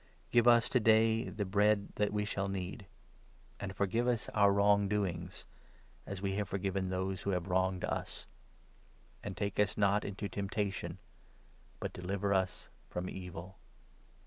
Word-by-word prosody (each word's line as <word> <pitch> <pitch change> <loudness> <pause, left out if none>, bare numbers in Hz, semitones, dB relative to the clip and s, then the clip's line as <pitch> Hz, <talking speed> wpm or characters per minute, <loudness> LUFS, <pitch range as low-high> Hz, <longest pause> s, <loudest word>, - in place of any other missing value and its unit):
Give 120 0 +5
us 120 -1 +6
to 125 - +3
day 110 0 +5
1 - - -3
1 - - -8
the 105 -1 -1
bread 100 +1 +2
that 105 -1 +1
we 105 0 0
shall 100 -1 -1
need; 95 +1 -5 0.7
And 95 -1 -5
forgive 105 +6 +1
us 120 -2 0
our 100 -2 +4
wrong 100 0 +4
doings, 95 -3 -2 0.6
12 - - -8
as 95 -2 -5
we 100 - 0
have 105 -1 -2
forgiven 95 -1 -1
those 95 0 -2
who - - -3
have 90 -1 -1
wronged 95 0 +1
us; - - -3 1.0
And 100 -2 -5
take 100 -1 -2
us 105 0 +2
not 100 0 +3
into 100 +1 -4
temptation, 100 0 -2
13 - - -14 0.8
but - - -4
deliver 100 +2 -1
us 95 -1 0 0.2
from 90 +1 -4
Evil.' 90 0 -8
100 Hz, 170 wpm, -33 LUFS, 95-105 Hz, 1.0 s, us